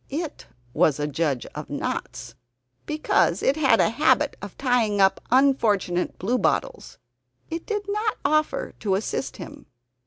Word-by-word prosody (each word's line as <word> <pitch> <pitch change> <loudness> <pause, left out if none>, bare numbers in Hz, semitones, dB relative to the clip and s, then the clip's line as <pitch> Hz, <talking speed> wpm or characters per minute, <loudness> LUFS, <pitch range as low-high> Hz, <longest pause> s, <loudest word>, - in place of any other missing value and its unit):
It 310 +2 -5 0.3
was 155 -3 +2
a 145 - 0
judge 145 -3 -1
of - - -7
knots - - -4 0.5
because 305 0 +1
it 270 - +3
had 270 -7 +3
a - - +3
habit 295 +3 +2
of 200 -1 -9
tying 240 -6 +1
up 195 0 +3
unfortunate 225 -9 +2
bluebottles. 250 - -1 0.5
It 330 +1 -5
did 420 -2 -2
not 425 +1 -1
offer 305 +1 0
to 195 -3 0
assist 135 -9 -3
him. - - -10
245 Hz, 135 wpm, -24 LUFS, 190-305 Hz, 0.5 s, it